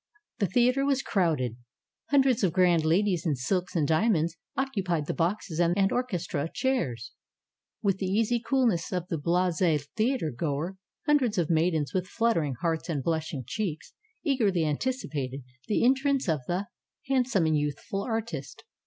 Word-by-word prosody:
The 200 - +2
theater 250 +7 +3
was 275 -1 +1
crowded. 155 - 0 0.5
Hundreds 265 -5 +3
of 180 -4 +2
grand 175 -3 +4
ladies 175 +2 +2
in 155 -5 +1
silks 180 +9 -2
and 155 -4 +2
diamonds 165 -1 +2 0.2
occupied 195 - -1
the - - -2
boxes 175 -1 -1
and 180 +3 +3
orchestra 180 - -2
chairs, 160 - -1 0.7
with 195 -2 +1
the 190 - -1
easy 225 +5 +1
coolness 235 -8 +1
of 180 -1 -2
the 165 - -1
blase 175 +2 +1 0.3
theatergoer. 170 - -1 0.3
Hundreds 280 -8 +2
of 170 -2 +1
maidens 160 -3 +1
with 185 0 -1
buttering 165 - +2
hearts 165 0 -1
and 145 -5 -1
blush 160 0 -1
ing 135 -4 -4
cheeks, 180 - -4 0.3
eagerly 215 - +2
anticipated 145 - -2 0.2
the 215 - +2
entrance 270 0 +2
of 155 -5 +1
the 180 +3 -1 0.4
handsome 250 -9 +2
and 155 -1 +2
youthful 150 +7 -3
artist. 225 +1 -4
180 Hz, 145 wpm, -28 LUFS, 160-230 Hz, 0.7 s, grand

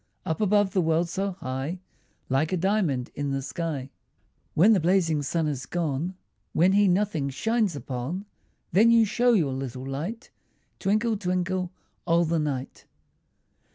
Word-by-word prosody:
Up 160 +6 -2
above 205 -1 +3
the 185 - +3
world 165 +1 +1
so 195 +2 -2
high, 140 0 -4 0.5
Like 135 +5 +1
a 185 - +1
diamond 175 -9 0
in 145 0 -3
the 135 0 -2
sky. 145 -4 -4 0.6
When 200 +8 +6
the 200 - +4
blazing 165 -3 +2
sun 160 +2 -1
is 135 -3 -3
gone, 170 +1 -2 0.4
When 180 +4 +4
he 205 +1 +4
nothing 180 -6 +1
shines 215 - 0
upon, 135 - -4 0.5
Then 215 +7 +5
you 230 -1 +6
show 240 +4 +3
your 155 - +2
little 130 -1 -5
light, 170 - -5 0.5
Twinkle, 215 +3 +1
twinkle, 185 -1 -1 0.4
all 170 0 +4
the 165 0 +1
night. 140 -4 -4
170 Hz, 150 wpm, -26 LUFS, 140-195 Hz, 0.6 s, When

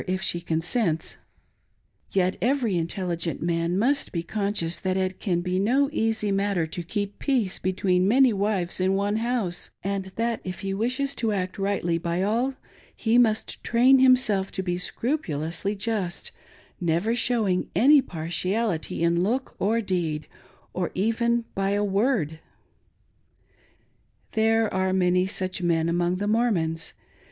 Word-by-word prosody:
if 185 +1 0
she 170 - +1
consents; 165 +1 -1 0.9
yet 185 -1 +1
every 250 -4 +1
inteUigent 170 -1 -1
man 170 +1 0
must 275 +7 +1
be 170 -2 -2
conscious 200 -4 -1
that 185 +1 -1
it 185 0 -1
can 175 -4 0
be 180 +1 -1
no 270 +8 +2
easy 220 -5 0
matter 195 -3 +1
to 175 +3 -5
keep 200 +3 -4
peace 245 -10 0
between 185 0 +1
many 255 +2 +5
wives 195 -3 -1
in 190 +1 +2
one 200 +2 0
house, 220 -7 -2
and 195 0 -2
that, 230 0 -1
if 185 0 -6
he 195 -1 -2
wishes 255 +7 -1
to 225 -5 -1
act 190 0 -3
rightly 195 -4 0
by 170 +2 -1
all, 240 +6 0 0.4
he 230 +2 +2
must 220 -2 +1
train 255 +3 +5
himself 250 -7 +4
to 190 - -3
be 180 -1 -1
scrupulously 180 - -2
just, 195 -4 -2 0.5
never 175 +6 +1
showing 220 -6 +1
any 280 +4 +6
partiality 175 -1 -2
in 170 0 +2
look 245 +8 -1
or 225 +4 +2
deed/ 170 -6 -2 0.5
or 180 -2 -1
even 235 +4 +1
by 195 0 0
a 205 0 +1
word. 195 - 0 1.9
There 225 0 +2
are 190 0 +1
many 180 0 +2
such 185 -1 -2
men 165 -2 +1
among 175 +1 +1
the 205 +3 -2
Mormons. 190 -8 0
195 Hz, 145 wpm, -25 LUFS, 175-225 Hz, 1.9 s, any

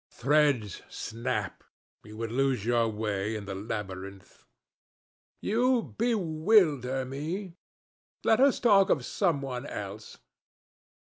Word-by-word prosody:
"Threads 135 - +1
snap. 115 +1 -4 0.4
You 105 0 -12
would 115 0 -4
lose 130 -4 0
your 120 -1 +2
way 105 -1 -2
in 105 -2 -5
the 95 - -5
labyrinth." 95 -2 -7 0.9
"You 240 +2 +1
bewilder 160 - +2
me. 165 +8 -5 0.7
Let 220 - +4
us 275 0 +4
talk 200 -5 +5
of - - +1
some 165 -8 0
one 130 0 -5
else." 105 -1 -7
130 Hz, 105 wpm, -28 LUFS, 105-180 Hz, 0.9 s, talk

